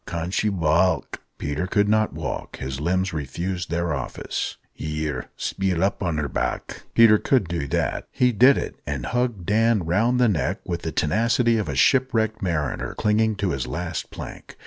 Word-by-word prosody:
"Can 85 Hz, 0 st, -3 dB
she 105 Hz, +2 st, +1 dB
waalk?" 85 Hz, -1 st, +1 dB, 0.2 s
Peter 75 Hz, +5 st, -2 dB
couldn't 105 Hz, +2 st, +2 dB
walk 75 Hz, -4 st, -5 dB
his 65 Hz, 0 st, -4 dB
limbs 95 Hz, +3 st, 0 dB
refused 85 Hz, +5 st, -3 dB
their 85 Hz, -1 st, -1 dB
office. 70 Hz, -4 st, -4 dB, 0.2 s
"Here, 75 Hz, -4 st, -4 dB
speel 95 Hz, -3 st, -1 dB
up 100 Hz, -, 0 dB
on 85 Hz, -5 st, -1 dB
her 75 Hz, -1 st, -1 dB
back." -, -, -3 dB
Peter 110 Hz, -2 st, +7 dB
could 125 Hz, -9 st, +2 dB
do 85 Hz, -4 st, -2 dB
that. -, -, -1 dB
He 125 Hz, -1 st, +3 dB
did 125 Hz, +5 st, +6 dB
it, -, -, -4 dB
and 70 Hz, -4 st, -3 dB
hugged 120 Hz, -7 st, -1 dB
Dan 110 Hz, 0 st, +3 dB
round 115 Hz, +9 st, +2 dB
the 125 Hz, -, +5 dB
neck 95 Hz, -8 st, 0 dB
with 85 Hz, -1 st, -3 dB
the 80 Hz, -, -3 dB
tenacity 115 Hz, +8 st, +2 dB
of 105 Hz, -, -3 dB
a 70 Hz, -, -2 dB
shipwrecked 110 Hz, -, +2 dB
mariner 80 Hz, -7 st, -2 dB
clinging 110 Hz, 0 st, +2 dB
to 100 Hz, -2 st, -1 dB
his 70 Hz, -5 st, -2 dB
last 85 Hz, -1 st, -4 dB
plank. -, -, -9 dB
90 Hz, 170 wpm, -24 LUFS, 80-110 Hz, 0.2 s, Peter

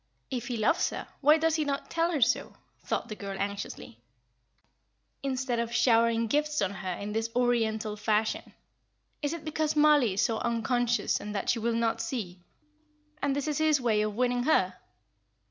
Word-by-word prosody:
"If 245 Hz, -2 st, -3 dB
he 245 Hz, -2 st, -2 dB
loves 215 Hz, -, +2 dB
her, -, -, -6 dB
why 300 Hz, +2 st, +6 dB
does 325 Hz, 0 st, +1 dB
he 310 Hz, -, +1 dB
not 280 Hz, -1 st, -3 dB
tell 335 Hz, +1 st, +1 dB
her 300 Hz, -5 st, -1 dB
so?" 230 Hz, -, +2 dB, 0.3 s
thought -, -, -2 dB
the 215 Hz, -, -6 dB
girl, 200 Hz, -1 st, -6 dB
anxiously, 200 Hz, -, -5 dB, 1.2 s
"instead 260 Hz, -3 st, -1 dB
of 235 Hz, 0 st, -2 dB
showering 230 Hz, -1 st, +3 dB
gifts 300 Hz, +5 st, 0 dB
on 185 Hz, -, +1 dB
her 185 Hz, -1 st, -4 dB
in 200 Hz, +3 st, -5 dB
this 225 Hz, +1 st, -1 dB
Oriental 225 Hz, -3 st, +1 dB
fashion. 215 Hz, 0 st, -1 dB, 0.7 s
Is 290 Hz, -1 st, -1 dB
it 335 Hz, -1 st, -6 dB
because 310 Hz, 0 st, -1 dB
Mollie 295 Hz, -8 st, +5 dB
is 195 Hz, -, +1 dB
so 225 Hz, -1 st, 0 dB
unconscious 240 Hz, +1 st, 0 dB
and 210 Hz, 0 st, -6 dB
that 200 Hz, -, +1 dB
she 230 Hz, -, -1 dB
will 230 Hz, +1 st, 0 dB
not 230 Hz, -1 st, 0 dB
see, 220 Hz, -7 st, -4 dB, 0.8 s
and 280 Hz, -1 st, +1 dB
this 285 Hz, +1 st, -2 dB
is 300 Hz, -1 st, -1 dB
his 310 Hz, -2 st, +3 dB
way 225 Hz, -4 st, +2 dB
of 210 Hz, -1 st, -2 dB
winning 245 Hz, +1 st, +1 dB
her? 315 Hz, -, +3 dB
235 Hz, 180 wpm, -29 LUFS, 215-285 Hz, 1.2 s, why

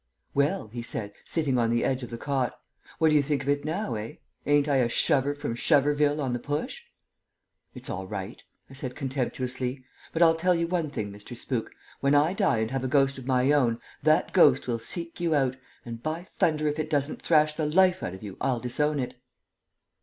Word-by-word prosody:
"Well," 140 Hz, -, +1 dB
he 120 Hz, +2 st, -6 dB
said, 105 Hz, -3 st, -3 dB
sitting 140 Hz, -6 st, 0 dB
on 115 Hz, -1 st, +2 dB
the 120 Hz, 0 st, +1 dB
edge 130 Hz, 0 st, 0 dB
of 125 Hz, -, -6 dB
the 115 Hz, -, -6 dB
cot, 135 Hz, -1 st, -2 dB, 0.4 s
"what 160 Hz, -, +4 dB
do 155 Hz, -, +3 dB
you 150 Hz, -, +6 dB
think 140 Hz, -1 st, -1 dB
of 140 Hz, -, -3 dB
it 145 Hz, 0 st, +1 dB
now, 160 Hz, -, -2 dB
eh? 110 Hz, +1 st, -5 dB, 0.3 s
Ain't 145 Hz, 0 st, +4 dB
I 140 Hz, -2 st, +3 dB
a 120 Hz, -2 st, +2 dB
shover 145 Hz, +2 st, +2 dB
from 145 Hz, -5 st, -3 dB
Shoverville 145 Hz, +3 st, +2 dB
on 130 Hz, -4 st, -1 dB
the 120 Hz, -, -1 dB
Push?" 145 Hz, +4 st, -4 dB, 0.9 s
"It's -, -, -7 dB
all 95 Hz, +1 st, -4 dB
right," 100 Hz, +2 st, -6 dB, 0.3 s
I -, -, -14 dB
said, 130 Hz, -2 st, -4 dB
contemptuously. 130 Hz, -1 st, -3 dB, 0.3 s
"But 165 Hz, -, +3 dB
I'll 165 Hz, -1 st, +6 dB
tell 175 Hz, +2 st, +2 dB
you 170 Hz, 0 st, +1 dB
one 170 Hz, -3 st, -1 dB
thing, 110 Hz, -7 st, -4 dB
Mr. 105 Hz, +4 st, -10 dB
Spook: 120 Hz, -2 st, -3 dB, 0.3 s
when 140 Hz, +1 st, +3 dB
I 150 Hz, +5 st, +4 dB
die 195 Hz, -, +2 dB
and 110 Hz, 0 st, -1 dB
have 135 Hz, -1 st, -2 dB
a -, -, 0 dB
ghost 135 Hz, 0 st, +2 dB
of 130 Hz, -, -10 dB
my 130 Hz, +1 st, +3 dB
own, 120 Hz, -6 st, +2 dB, 0.2 s
that 155 Hz, 0 st, +3 dB
ghost 145 Hz, -8 st, +5 dB
will 120 Hz, -2 st, -1 dB
seek 170 Hz, +10 st, -4 dB
you 170 Hz, -2 st, +1 dB
out, 130 Hz, -3 st, +1 dB, 0.3 s
and, 115 Hz, -1 st, -7 dB
by 160 Hz, +4 st, -3 dB
thunder, 155 Hz, -4 st, 0 dB
if 150 Hz, +1 st, -1 dB
it 155 Hz, 0 st, -2 dB
doesn't 145 Hz, -1 st, -1 dB
thrash 155 Hz, -2 st, +3 dB
the 155 Hz, -1 st, -1 dB
life 185 Hz, +3 st, +4 dB
out 90 Hz, -, -4 dB
of 95 Hz, -, -12 dB
you, 100 Hz, -3 st, -8 dB
I'll 130 Hz, -3 st, +1 dB
disown 145 Hz, +5 st, 0 dB
it!" 125 Hz, -, -5 dB
140 Hz, 215 wpm, -27 LUFS, 125-155 Hz, 0.9 s, you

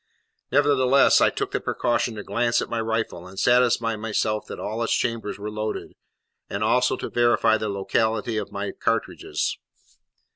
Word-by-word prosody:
Nevertheless, 140 Hz, -1 st, +4 dB
I -, -, +5 dB
took -, -, -4 dB
the -, -, -1 dB
precaution 120 Hz, -1 st, -1 dB
to 105 Hz, -, -6 dB
glance 120 Hz, +4 st, +1 dB
at -, -, -4 dB
my 115 Hz, -1 st, -1 dB
rifle, 110 Hz, -6 st, -2 dB
and 95 Hz, +1 st, -13 dB
satisfy 120 Hz, -1 st, +3 dB
myself 110 Hz, 0 st, -2 dB
that -, -, -7 dB
all 110 Hz, +2 st, -4 dB
its 115 Hz, -, +1 dB
chambers 115 Hz, -3 st, -2 dB
were 105 Hz, +1 st, -6 dB
loaded, 110 Hz, 0 st, -4 dB, 0.6 s
and 100 Hz, -, -2 dB
also 125 Hz, +3 st, +2 dB
to -, -, -5 dB
verify 120 Hz, -2 st, +3 dB
the 110 Hz, -1 st, -2 dB
locality 110 Hz, +3 st, 0 dB
of 105 Hz, -, -4 dB
my 100 Hz, 0 st, -4 dB
cartridges. -, -, -2 dB
110 Hz, 160 wpm, -24 LUFS, 105-120 Hz, 0.6 s, I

